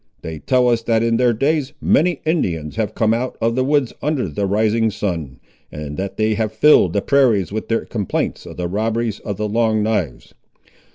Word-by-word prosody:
They 80 Hz, -1 st, -6 dB
tell 125 Hz, -, +2 dB
us 120 Hz, -2 st, +2 dB
that 115 Hz, 0 st, +1 dB
in 115 Hz, 0 st, +2 dB
their 125 Hz, 0 st, +3 dB
days 140 Hz, +4 st, 0 dB
many 170 Hz, -1 st, +2 dB
Indians 85 Hz, -, -1 dB
have 110 Hz, -3 st, -2 dB
come 110 Hz, -1 st, +2 dB
out 125 Hz, +2 st, -2 dB
of 115 Hz, +1 st, +1 dB
the 130 Hz, +2 st, +1 dB
woods 140 Hz, -2 st, +1 dB
under 145 Hz, -6 st, -1 dB
the 95 Hz, +6 st, -2 dB
rising 110 Hz, +2 st, +2 dB
sun, 85 Hz, -11 st, -4 dB, 0.3 s
and 75 Hz, -1 st, -6 dB
that 95 Hz, +3 st, -5 dB
they 110 Hz, 0 st, +1 dB
have 110 Hz, 0 st, -1 dB
filled 110 Hz, -, +4 dB
the 100 Hz, -, 0 dB
prairies 125 Hz, -10 st, +2 dB
with 110 Hz, +1 st, -4 dB
their 115 Hz, -, -1 dB
complaints 105 Hz, -5 st, -3 dB
of -, -, -10 dB
the 90 Hz, -1 st, -2 dB
robberies 110 Hz, +3 st, -1 dB
of 100 Hz, -3 st, -5 dB
the 105 Hz, 0 st, -2 dB
Long 110 Hz, 0 st, +1 dB
knives. 80 Hz, -, -2 dB
110 Hz, 195 wpm, -19 LUFS, 100-125 Hz, 0.3 s, filled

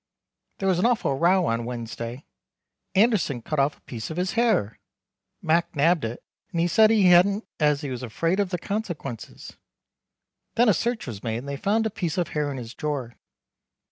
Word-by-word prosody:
There 195 Hz, -, -2 dB
was 185 Hz, -2 st, +2 dB
an 215 Hz, -, +4 dB
awful 240 Hz, -, +1 dB
row 175 Hz, +5 st, +3 dB
on 115 Hz, -2 st, 0 dB
Wednesday. 120 Hz, +2 st, -6 dB, 0.7 s
Anderson 190 Hz, -, +2 dB
cut 155 Hz, +3 st, -2 dB
off 140 Hz, +2 st, +1 dB
a -, -, -32 dB
piece 115 Hz, -3 st, -7 dB
of 160 Hz, -, -6 dB
his 180 Hz, +1 st, 0 dB
hair. 220 Hz, -, +1 dB, 0.6 s
Mac 170 Hz, +2 st, +1 dB
nabbed 160 Hz, +3 st, +3 dB
it, 115 Hz, +2 st, -6 dB, 0.3 s
and 170 Hz, -, -2 dB
he 170 Hz, -, +3 dB
said 215 Hz, +5 st, +5 dB
he 210 Hz, -5 st, +5 dB
hadn't 195 Hz, +5 st, +5 dB
as 150 Hz, -2 st, +2 dB
he 140 Hz, -3 st, -4 dB
was 125 Hz, -1 st, -5 dB
afraid 165 Hz, -, -1 dB
of 200 Hz, -2 st, +1 dB
the 180 Hz, -, -2 dB
consequenses. 175 Hz, -, -6 dB, 1.0 s
Then 240 Hz, 0 st, +4 dB
a -, -, +6 dB
search 235 Hz, +4 st, -1 dB
was 110 Hz, -6 st, -7 dB
made 115 Hz, -2 st, -2 dB
and 125 Hz, +4 st, -7 dB
they 140 Hz, -, -3 dB
fond 215 Hz, +9 st, +1 dB
a 220 Hz, -, -1 dB
piece 175 Hz, -6 st, -3 dB
of 175 Hz, -, 0 dB
hair 150 Hz, -1 st, -1 dB
in 140 Hz, -, -5 dB
his 120 Hz, -1 st, -7 dB
drawer. 140 Hz, -6 st, -3 dB
165 Hz, 195 wpm, -25 LUFS, 130-195 Hz, 1.0 s, a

